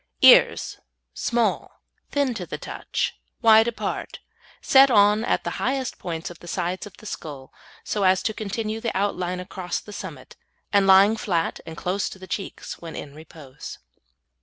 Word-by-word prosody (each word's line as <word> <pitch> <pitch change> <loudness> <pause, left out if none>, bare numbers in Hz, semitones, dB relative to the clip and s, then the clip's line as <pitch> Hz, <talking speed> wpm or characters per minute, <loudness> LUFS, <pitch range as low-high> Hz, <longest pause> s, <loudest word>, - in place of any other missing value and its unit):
EARS - - +6 0.3
Small, 235 - -1 0.3
thin 280 -3 +1
to 230 - -6
the - - -5
touch, - - -3 0.2
wide 225 0 +7
apart, 235 - -4 0.4
set 270 0 +6
on 210 -1 +5
at - - 0
the - - -3
highest 265 0 -1
points 170 +1 -5
of 175 - -13
the 175 - -13
sides 180 +3 -3
of 200 - -16
the - - -15
skull, 145 -9 -7 0.3
so 210 - -2
as 185 0 +4
to 220 - 0
continue 215 +1 -4
the 230 -4 -2
outline 185 -2 -1
across 180 -1 -4
the 210 - -12
summit, - - -8 0.4
and 200 -1 +4
lying 195 +3 +7
flat 175 -7 -1
and 160 -1 -8
close 185 +5 -1
to - - -10
the 190 - -11
cheeks 190 +2 -6
when 165 -1 -8
in 140 - -7
repose. 150 -3 -11
195 Hz, 165 wpm, -24 LUFS, 175-220 Hz, 0.4 s, wide